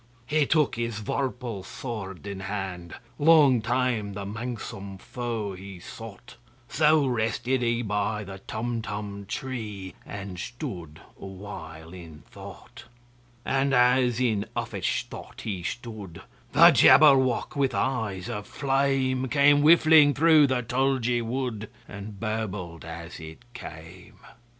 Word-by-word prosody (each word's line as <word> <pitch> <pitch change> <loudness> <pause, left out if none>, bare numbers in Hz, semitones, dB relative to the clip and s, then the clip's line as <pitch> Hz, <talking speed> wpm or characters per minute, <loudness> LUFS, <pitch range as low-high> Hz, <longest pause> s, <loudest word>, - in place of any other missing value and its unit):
He 150 +1 +1
took 150 -6 +2
his 115 -2 -2
vorpal 120 -2 -3
sword 105 -7 -7
in 100 -1 -5
hand:Long 115 - +2
time 120 -3 0
the 100 0 -5
manxome 100 -3 -6
foe 115 -2 -4
he 95 0 -10
sought—So 120 - -2
rested 120 +1 0
he 120 0 0
by 105 0 -1
the 95 -1 -9
Tumtum 105 -3 -5
tree, 105 -8 -5
And 100 -3 -7
stood 90 - -7 0.2
awhile 90 -4 -9
in 85 -4 -11
thought. - - -12 0.6
And 135 0 +1
as 125 -1 +3
in 110 -5 0
uffish 60 -1 -2
thought - - -10
he 95 -5 -4
stood, 110 -4 -7 0.3
The - - +8
Jabberwock, 135 -5 +5
with 135 -5 +1
eyes 105 -4 -1
of 105 -4 -5
flame, 135 -1 0
Came 145 +1 +4
whiffling 155 -2 +6
through 155 -1 +6
the 130 -2 0
tulgey 125 -1 +1
wood, 115 -3 -3 0.2
And 100 0 -9
burbled 105 -6 -4
as 85 +1 -8
it 80 +6 -11
came! 85 -4 -11
115 Hz, 115 wpm, -26 LUFS, 100-130 Hz, 0.6 s, The